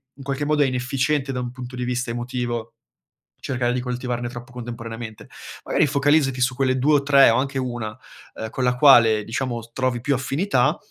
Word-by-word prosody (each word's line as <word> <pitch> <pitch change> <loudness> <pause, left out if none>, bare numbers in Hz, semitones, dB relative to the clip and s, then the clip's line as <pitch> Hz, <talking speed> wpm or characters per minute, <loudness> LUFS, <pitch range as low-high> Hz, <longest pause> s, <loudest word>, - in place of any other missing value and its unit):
in 135 - -12
qualche 140 +1 -2
modo 150 0 +2
è - - +3
inefficiente 135 +2 -1
da 125 - -2
un 120 - -4
punto 125 0 -8
di 125 - -3
vista 125 0 -2
emotivo, 120 -1 -4 0.6
cercare 125 -2 -1
di - - -1
coltivarne 125 -1 -3
troppo 120 +1 -9
contemporaneamente. 115 -2 -7 0.4
Magari 155 - +2
focalizzati 140 -1 +2
su 130 +1 +2
quelle 130 -1 +1
2 145 +4 +3
o 145 - +3
3 140 -1 +6
o 115 - +2
anche 135 +1 -1
1, 120 -4 -4 0.4
uhm, 110 0 -6
con 130 - -2
la 125 0 +2
quale, 120 -6 +6
diciamo, 120 0 -3
s 115 - -15
trovi 130 -1 -1
più 140 +3 0
affinità, 135 +9 +1
125 Hz, 195 wpm, -22 LUFS, 120-135 Hz, 0.6 s, 3